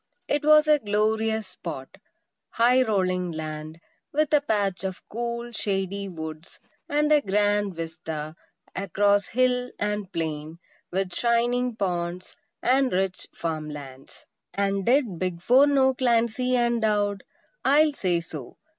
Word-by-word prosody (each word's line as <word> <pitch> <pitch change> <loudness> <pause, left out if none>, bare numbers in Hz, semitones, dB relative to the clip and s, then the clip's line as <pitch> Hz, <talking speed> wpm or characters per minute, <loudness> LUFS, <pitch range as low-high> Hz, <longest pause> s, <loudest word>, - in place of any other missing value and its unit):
It 290 +1 0
was 305 0 +6
a 300 -1 +5
glorious 220 -1 0
spot; 165 -7 -8 0.5
high, 245 +3 +4
rolling 185 -6 0
land, 155 0 -6 0.3
with 305 +1 0
a 295 - +5
patch 200 -8 -1
of 190 -1 -4
cool, 235 +1 -4
shady 200 -2 -2
woods, 160 -1 -8 0.3
and 295 +1 +2
a 300 -1 +6
grand 205 -1 +1
vista 160 -2 -5 0.4
across 200 +1 +2
hill 250 0 +1
and 210 -2 -2
plain, 160 -2 -4 0.3
with 185 -1 -1
shining 240 +1 +1
ponds 180 -3 -3 0.3
and 260 +1 +3
rich 185 0 -1
farm 155 -2 -3
lands. 135 -2 -10 0.3
And 195 -1 0
did 240 - +2
"Big 185 -2 -2
Four" 255 +10 +5
know 265 -2 +4
Clancy 250 0 +1
and 240 -1 +1
Dowd? 205 -2 +1 0.4
I'll 295 +2 +4
say 180 -9 0
so! 155 -6 -9
205 Hz, 130 wpm, -25 LUFS, 175-245 Hz, 0.5 s, was